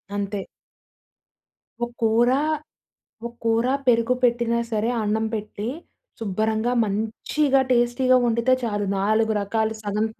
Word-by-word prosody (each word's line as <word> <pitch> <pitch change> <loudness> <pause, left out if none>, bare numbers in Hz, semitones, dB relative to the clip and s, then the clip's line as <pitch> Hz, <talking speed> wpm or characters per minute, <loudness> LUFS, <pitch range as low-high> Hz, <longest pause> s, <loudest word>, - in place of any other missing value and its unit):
అంతే. 200 -1 -3 1.4
ఒక - - 0
కూర, 230 +2 +3 1.0
ఒక - - -5
కూర 230 +1 +2 0.2
పెరుగు 235 +1 +3
పెట్టినా 235 -1 +2
సరే, 220 0 0
అన్నం 215 +1 0
పెట్టి 210 0 -5 0.5
శుభ్రంగా 220 +3 0
మంచిగా 230 +7 0
టేస్టీగా 250 +1 +3
వండితే 235 +2 +2
చాలు. 205 -3 -1
4 215 +3 +2
రకాలు 220 +2 -1
సగం 210 +1 -1
225 Hz, 105 wpm, -23 LUFS, 210-240 Hz, 1.4 s, కూర